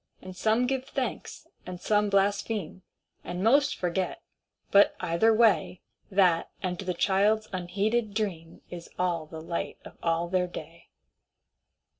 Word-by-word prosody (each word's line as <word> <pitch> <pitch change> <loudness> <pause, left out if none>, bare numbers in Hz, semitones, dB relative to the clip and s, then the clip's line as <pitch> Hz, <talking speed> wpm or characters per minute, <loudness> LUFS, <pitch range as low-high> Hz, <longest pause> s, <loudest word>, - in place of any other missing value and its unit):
And 215 +6 0
give 265 0 -1
some - - -19
thanks, 265 -2 -4 0.2
and 180 -1 -7
some 210 +2 +1
blaspheme, 200 -2 0 0.4
And 180 +1 -4
most 280 +6 +4
forget, 180 +1 -2 0.5
but, 200 0 +6
either 170 +7 +2
way, 220 -4 +3 0.3
That 185 -4 +3
and 180 -1 -2
the 185 -2 -3
child's 210 +2 +2
unheeded 200 +5 -1
dream 175 -7 -3
Is 170 -1 -8
all 175 -3 -1
the 160 0 -8
light 170 +1 -4
of - - -13
all 165 0 0
their 180 0 +1
day. 170 -1 -10
190 Hz, 135 wpm, -28 LUFS, 175-215 Hz, 0.5 s, but